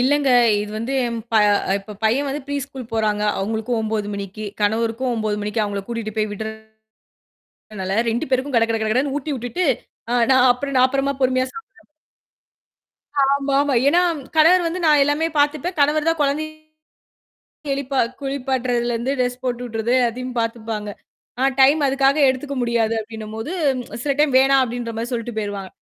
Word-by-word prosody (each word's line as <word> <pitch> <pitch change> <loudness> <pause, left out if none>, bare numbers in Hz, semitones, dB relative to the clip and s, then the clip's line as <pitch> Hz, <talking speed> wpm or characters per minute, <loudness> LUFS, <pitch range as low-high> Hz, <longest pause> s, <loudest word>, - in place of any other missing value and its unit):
இல்லங்க. 280 +2 +2 0.3
இது 210 - -5
வந்து 230 +5 -3
எம் 235 -1 -3 0.2
ப - - +4 0.4
இப்ப 200 +2 -10
பையன் 250 +6 +2
வந்து 280 +1 -4
ப்ரீ 285 0 -3
ஸ்கூல் 265 -3 -9
போறாங்க. 215 -2 0 0.2
அவுங்களுக்கும் 220 +4 -2
9:00 215 -1 -2
மணிக்கி, 200 +1 -6 0.2
கணவருக்கும் 225 +4 0
9:00 215 -2 -1
மணிக்கு 210 +2 -1
அவுங்கள 200 -1 -3
கூட்டிட்டு 230 -3 -5
போய் 215 -1 0 1.2
விட்றனால 195 -2 -5
2 230 +3 -2
பேருக்கும் 260 +1 0
கட 230 - +5
கட 225 - +1
கட 220 - 0
கடன்னு 270 +4 0
ஊட்டி 295 +1 -3
விட்டுட்டு, 245 +9 -2 0.4
ஆ - - 0 0.2
நான் 260 -1 +5
அப்புறம் 275 +2 -5
நான் 255 - +6
அப்பறமா 275 +1 0
பொறுமையா 255 0 +2
சாப்பிட 455 0 -9 1.6
ஆமா, 275 0 +2
ஆமா. 285 -2 0
ஏன்னா 345 +5 +4 0.4
கணவர் 345 +3 +6
வந்து 340 +2 -2
நான் 300 -2 +5
எல்லாமே 290 +3 +1
பாத்துப்பேன். 300 +5 0
கணவர்தான் 310 +3 +2
குழந்தைய 295 +2 0 1.2
எழிப்பா 275 -1 -2 0.2
குளிப்பாட்டுறதுல 255 -3 -1
இருந்து 240 +4 -1
டிரெஸ் 250 0 -1
போட்டுவிட்றது 240 -2 -2
அதையும் 250 +2 -5
பாத்துப்பாங்க. 225 -2 -3 0.5
ஆ. - - +1 0.2
டைம் 280 +4 +6
அதுக்காக 275 +1 +2
எடுத்துக்க 275 +2 -3
முடியாது. 230 -2 +1
அப்பிடின்னம்போது 220 +4 -7 0.4
ச் - - -6
சில 285 - +1
டைம் 295 -3 +3
வேணாம் 270 0 +4
அப்பிடின்றமாரி 235 -1 -4
சொல்லிட்டு 235 -1 -4
போயிருவாங்க. 205 -3 -4
250 Hz, 155 wpm, -21 LUFS, 225-280 Hz, 1.6 s, நான்